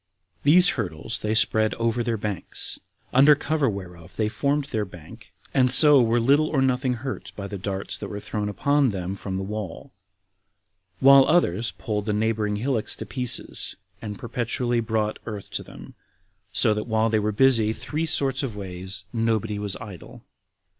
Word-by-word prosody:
These 180 +5 +6
hurdles 100 - -3
they 110 +1 -1
spread 110 0 +3
over 115 +1 0
their 115 -1 -1
banks, 100 -4 -4 0.3
under 140 +3 +7
cover 145 -2 0
whereof 90 -3 -8
they 105 +1 0
formed 140 +5 0
their 110 -5 -2
bank, 90 -5 -13 0.2
and 130 -2 +3
so 145 +1 +8
were 115 0 +2
little 140 +6 +3
or 150 - 0
nothing 130 -1 +1
hurt 130 - -5
by 100 - -6
the 100 0 -6
darts 95 +1 -3
that - - -5
were 100 - -6
thrown 105 0 -4
upon 140 +7 +2
them 95 -2 -4
from 95 -1 -5
the 95 - -3
wall, 105 -3 -6 1.1
while 135 0 +7
others 120 - +2
pulled 105 -3 -4
the 105 - +1
neighboring 105 -1 0
hillocks 115 +1 -1
to - - -7
pieces, 125 -2 -1 0.3
and 105 -2 -6
perpetually 120 +1 -2
brought 110 -1 -1
earth 105 -3 -7
to - - -2
them; - - -12 0.6
so 110 - +3
that 105 +2 -4
while 110 0 +1
they 110 - +2
were 105 0 0
busy 115 -1 +3
three 150 +8 -3
sorts 135 -4 0
of 130 -7 -4
ways, 95 -1 -5
nobody 110 -2 -1
was 105 -2 -4
idle. 100 -7 -11
110 Hz, 170 wpm, -24 LUFS, 105-130 Hz, 1.1 s, so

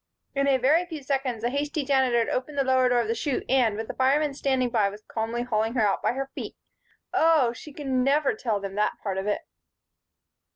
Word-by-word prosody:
In 275 0 +1
a 270 -1 +4
very 290 +7 +3
few 315 -4 -7
seconds, 265 -4 -2
the 240 - 0
hasty 290 +1 -2
Janitor 265 -3 +2
had 230 - +1
opened 285 +3 -3
the 275 - +3
lower 260 -1 +3
door 245 -1 +3
of 230 - -3
the 225 - +1
chute 260 +3 -2
and, 245 -5 +2
with 225 0 -4
the - - -5
firemen 280 +3 +2
standing 265 -3 0
by, 215 -4 +2
was 205 +2 -11
calmly 230 +2 -2
hauling 225 -1 -1
her 220 -4 +3
out 195 - 0
by - - +1
her 270 +1 -4
feet - - -6 0.6
Oh! 310 -7 +4
She 300 +5 -11
could 290 0 -9
never 270 +2 +2
tell 220 -5 -2
that 200 +1 -1
part 190 -2 -2
of 195 - -4
it. 210 - 0
255 Hz, 220 wpm, -26 LUFS, 225-275 Hz, 0.6 s, a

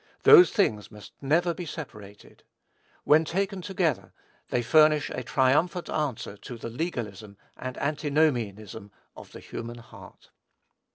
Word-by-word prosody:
Those 370 -5 +9
things 110 - 0
must 105 -1 -13
never 170 +5 +1
be 175 0 -7
separated. 105 -11 -10 0.6
When 155 +2 +5
taken 195 +4 -2
together, 180 -4 -2 0.4
they 120 - 0
furnish 155 +3 +4
a - - -4
triumphant 145 +8 +1
answer 115 -9 -3
to 120 +4 -9
the 115 0 -7
legalism 110 - -5 0.2
and 130 0 -7
antinomianism 125 -9 -1 0.2
of - - -13
the - - -11
human 120 +1 -8
heart. 115 - -15
135 Hz, 125 wpm, -26 LUFS, 115-160 Hz, 0.6 s, Those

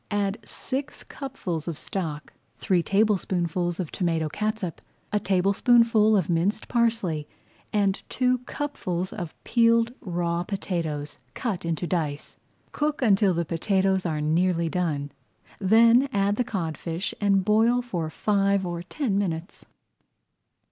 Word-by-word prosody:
Add 205 0 -1
six 270 +6 -4
cupfuls 185 - -5
of 165 -3 -3
stock, 155 -6 -5 0.2
three 180 -2 +2
tablespoonfuls 180 -3 0
of 175 -4 -3
tomato 165 -4 0
catsup, 215 -2 -3 0.3
a 210 - +3
tablespoonful 215 +3 +4
of 185 - 0
minced 180 +6 0
parsley, 225 -11 0 0.4
and 200 -2 +1
two 255 0 +1
cupfuls 185 -11 -3
of 175 -6 -6
peeled 230 0 +3
raw 170 -1 -1
potatoes 165 -7 -3 0.2
cut 195 -8 -3
into 165 +1 -1
dice. 155 -5 -2 0.4
Cook 295 -2 -1
until 200 -4 +4
the 170 0 0
potatoes 190 +3 +1
are 155 -2 -2
nearly 170 +2 +1
done, 155 -5 -1 0.5
then 230 +6 +5
add 200 -2 +1
the 250 - +2
codfish 170 -4 -3
and 195 -2 +3
boil 225 +4 +3
for 175 -10 -3
five 200 +1 +1
or 175 -1 -3
ten 200 - -1
minutes. 175 -2 -4
190 Hz, 125 wpm, -26 LUFS, 170-220 Hz, 0.5 s, then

